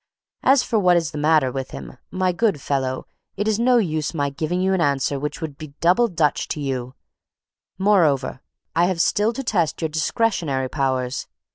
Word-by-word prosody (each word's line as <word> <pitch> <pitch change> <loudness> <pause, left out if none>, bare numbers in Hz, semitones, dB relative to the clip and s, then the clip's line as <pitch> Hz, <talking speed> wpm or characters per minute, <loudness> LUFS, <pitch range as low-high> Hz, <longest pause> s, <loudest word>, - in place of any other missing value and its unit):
As 270 -1 +4
for 225 -3 0
what 180 -3 +4
is 165 -2 -1
the 150 - -5
matter 150 -3 +3
with 135 0 -4
him, 65 -2 -9
my 185 -1 0
good 195 -3 +1
fellow, 130 -2 -2 0.3
it 205 +2 -1
is 220 0 +1
no 245 +1 +4
use 160 -7 -1
my 140 -2 0
giving 155 +5 -2
you 190 +1 +1
an 185 - +1
answer 140 -1 +1
which 150 +3 -4
would 150 -4 -6
be 155 -3 -10
double 185 +8 +4
Dutch 165 -7 0
to - - -4
you; 130 -3 -3 0.8
moreover, 160 -11 +2 0.3
I 170 +2 +4
have 180 -2 -1
still 210 +5 +2
to 270 +3 -5
test 175 - 0
your 160 - -1
discretionary 155 - 0
powers. 130 -3 -1
160 Hz, 185 wpm, -22 LUFS, 140-190 Hz, 0.8 s, As